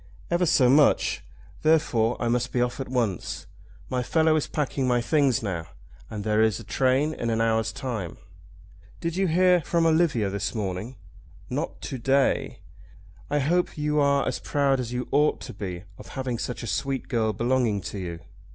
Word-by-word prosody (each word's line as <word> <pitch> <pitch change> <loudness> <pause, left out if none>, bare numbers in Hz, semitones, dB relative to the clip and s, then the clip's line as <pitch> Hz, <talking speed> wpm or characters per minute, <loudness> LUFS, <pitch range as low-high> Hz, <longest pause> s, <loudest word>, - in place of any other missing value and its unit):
"Ever 175 +1 +2
so 135 -5 +5
much; 140 +3 +4 0.4
therefore 125 -8 +2
I 120 - -1
must 120 +1 0
be 125 - 0
off 120 +2 0
at 135 - -4
once. 120 -8 -2 0.4
My 125 -1 -1
fellow 160 +5 +2
is 155 - 0
packing 140 -3 -1
my 125 -1 +3
things 135 -1 +2
now; 85 -6 -3 0.4
and 105 -2 -5
there 110 0 +2
is 110 -1 +2
a - - -9
train 130 +8 +1
in 120 -6 -3
an 115 0 0
hour's 110 -1 +1
time." 110 -10 -5 0.8
"Did 170 -1 -3
you 190 0 +1
hear 180 +1 +4
from 165 +2 +1
Olivia 155 - +2
this 100 +3 -3
morning?" 105 +4 -3 0.6
"Not - - -3
to 130 - -5
day." 135 +3 +1 0.7
"I 145 - +1
hope 165 +6 +1
you 150 0 +1
are 140 -1 +3
as 130 - -2
proud 140 -2 +1
as 120 -2 -3
you 125 0 -3
ought 150 +2 +3
to - - -7
be 95 -3 -6 0.2
of - - -11
having 125 -3 -2
such 125 - -4
a - - -4
sweet 135 +5 -2
girl 110 -3 +1
belonging 120 -2 +1
to 100 - -6
you." 85 -3 -5
125 Hz, 180 wpm, -26 LUFS, 110-145 Hz, 0.8 s, so